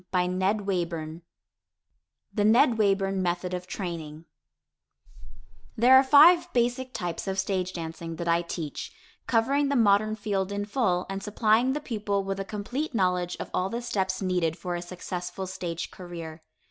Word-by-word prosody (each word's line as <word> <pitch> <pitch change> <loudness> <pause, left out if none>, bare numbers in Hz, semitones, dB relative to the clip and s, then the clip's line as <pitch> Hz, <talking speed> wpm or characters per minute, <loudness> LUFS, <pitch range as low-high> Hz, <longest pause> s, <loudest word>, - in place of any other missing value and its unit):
[Illustration: 180 0 +1
NW] 175 -5 -1 1.1
THE 210 - +1
NED 230 +2 +4
WAYBURN 195 -2 +2
METHOD 180 0 -1
OF 180 0 -4
TRAINING 165 -5 -6 1.5
There 245 +4 +7
are 265 - +8
five 335 +6 +6
basic 245 +1 0
types 175 -3 -4
of 190 0 -2
stage 190 -1 -1
dancing 165 0 -6
that 170 +1 -5
I 170 0 +3
teach, 170 -3 -5 0.4
covering 275 +5 +2
the 280 - +1
modern 215 -2 +3
field 200 -2 -2
in 205 0 -2
full, 205 -5 0
and 195 0 -4
supplying 220 +4 +2
the 295 - -2
pupil 205 -6 -2
with 195 0 -3
a - - -1
complete 240 +8 -4
knowledge 180 -3 0
of - - -6
all 185 +1 0
the 235 - -3
steps 190 -4 -1
needed 180 -3 0
for 180 -1 -4
a 175 - -4
successful 180 +1 -6
stage 175 -2 -5
career. 170 -3 -8
195 Hz, 155 wpm, -27 LUFS, 175-220 Hz, 1.5 s, are